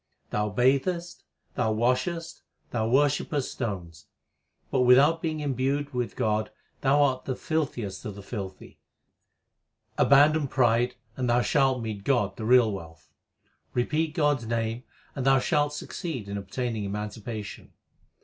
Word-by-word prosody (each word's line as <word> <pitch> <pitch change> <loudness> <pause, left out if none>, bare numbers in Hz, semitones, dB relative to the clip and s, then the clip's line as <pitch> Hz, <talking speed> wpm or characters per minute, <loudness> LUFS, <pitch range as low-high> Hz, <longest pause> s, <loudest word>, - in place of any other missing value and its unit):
Thou 105 0 0
bathest, 140 - 0 0.3
and 110 -4 0
washest, 130 +8 -1 0.3
and 110 -1 0
worshippest 145 0 +1
stones, 85 -9 -5 0.6
But 130 - +2
without 140 +6 +5
being 155 -2 -2
imbued 140 +1 -1
with 125 -1 -2
God 110 0 0 0.3
thou 140 +2 +4
art 130 -2 0
the 130 - -2
filthiest 125 - -3
of 105 - -5
the 100 - -10
filthy. 95 -3 -7 1.2
Abandon 145 +2 +5
pride, 120 -2 +2 0.2
and 125 -2 -1
thou 120 +1 +4
shalt 135 -3 +2
meet 105 -3 -5
God 105 -7 +1
the 110 - -6
real 120 -2 +5
wealth. 80 -5 -9 0.6
Repeat 155 +6 0
God 145 -4 +2
s 115 - -9
name, 115 +1 -2 0.3
and 135 - -3
thou 135 0 +5
shalt 145 +2 +1
succeed 150 - -5
in 100 - -5
obtaining 110 +3 -3
emancipation. 105 +1 -6
125 Hz, 135 wpm, -27 LUFS, 110-145 Hz, 1.2 s, without